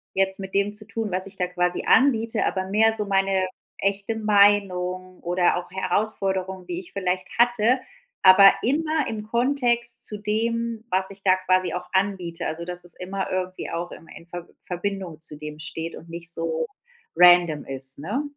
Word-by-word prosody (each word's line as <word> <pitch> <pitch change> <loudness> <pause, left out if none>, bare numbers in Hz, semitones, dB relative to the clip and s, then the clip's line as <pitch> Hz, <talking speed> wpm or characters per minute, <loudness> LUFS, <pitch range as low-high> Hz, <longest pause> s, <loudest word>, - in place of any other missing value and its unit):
jetzt 190 0 +2
mit 190 -1 -8
dem 200 +1 +1
zu 210 0 -4
tun, 225 -2 -4
was 185 +1 -1
ich 195 0 -12
da 180 - 0
quasi 180 0 -1
anbiete, 230 -5 +3
aber 190 -1 -2
mehr 220 +3 +3
so 210 -1 -2
meine 195 -1 +1 0.3
echte 200 +2 -1
Meinung 195 -4 +2
oder 175 +1 +2
auch 175 0 -5
Herausforderung, 190 -1 -1
die 350 - -4
ich 360 - -13
vielleicht 185 -1 -2
hatte, 240 +1 +3 0.4
aber 195 +1 +9
immer 310 +3 0
im 215 -2 -4
Kontext 240 0 0
zu 210 - -3
dem, 225 +2 -2
was 190 +1 0
ich 195 0 -13
da 185 -1 +6
quasi 185 0 +2
auch 180 0 -4
anbiete, 185 -3 -1
also, 165 +2 -4
dass 180 0 -4
es 175 - -5
immer 190 +1 -4
irgendwie 185 0 -3
auch 170 +1 -4
immer 165 - -12
in 170 0 -13
Verb 175 0 -7
Verbindung 180 -2 -4
zu 155 -2 -3
dem 150 0 -8
steht 160 +2 -6
und 165 - -12
nicht 170 +1 -6
so 165 -1 -2 0.5
random 175 -4 +6
ist, 135 0 -1
ne? 210 - -2
190 Hz, 175 wpm, -24 LUFS, 180-215 Hz, 0.5 s, aber